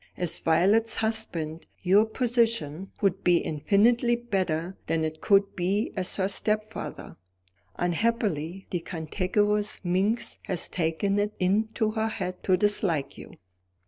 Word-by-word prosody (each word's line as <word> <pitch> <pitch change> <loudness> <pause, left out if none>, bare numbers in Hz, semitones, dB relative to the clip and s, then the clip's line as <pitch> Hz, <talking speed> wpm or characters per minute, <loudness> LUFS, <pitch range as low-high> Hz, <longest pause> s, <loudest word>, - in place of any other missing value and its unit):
As 175 -2 0
Violet's 205 +8 +3
husband, 175 -8 -3 0.2
your 195 +4 +5
position 225 - 0
would 195 -2 +1
be 175 -1 +5
infinitely 225 - +2
better 185 -7 -2
than 160 -1 0
it 155 0 -4
could 200 -1 +3
be 195 +5 0
as 185 -2 -1
her 190 -1 +1
stepfather. 215 +2 -3 0.6
Unhappily, 185 -2 -1
the 175 - 0
cantankerous 200 +6 -1
minx 195 +6 0
has 185 -4 0
taken 180 +4 0
it 210 +1 -1
into 215 +3 +1
her 220 0 -1
head 185 -4 -4
to 185 -1 +4
dislike 185 -7 0
you." - - -11
195 Hz, 125 wpm, -27 LUFS, 175-215 Hz, 0.6 s, your